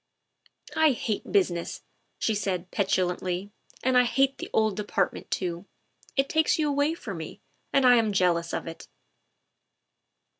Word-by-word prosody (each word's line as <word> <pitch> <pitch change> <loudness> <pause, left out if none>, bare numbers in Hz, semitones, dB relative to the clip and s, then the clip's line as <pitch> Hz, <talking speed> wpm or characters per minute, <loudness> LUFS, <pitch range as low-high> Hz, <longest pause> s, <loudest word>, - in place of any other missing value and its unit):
" - - -52 0.3
I 315 -3 +5
hate 220 -3 -3
business," 175 -3 0 0.3
she 220 - 0
said 190 -3 -2
petulantly, 185 0 -1 0.2
" - - -25
and 260 0 +2
I 250 0 +6
hate 270 +3 +1
the - - -6
old 220 -2 +2
Department 205 -2 -2
too. 175 +1 -3 0.5
It 270 0 +3
takes 315 +1 +2
you 310 -2 +1
away 285 +2 +1
from 200 - -7
me, 160 -1 -8 0.3
and 275 -2 +3
I 245 -1 +7
am 220 -2 +2
jealous 175 -3 +1
of - - -3
it." 165 0 -9
205 Hz, 155 wpm, -27 LUFS, 180-265 Hz, 0.5 s, I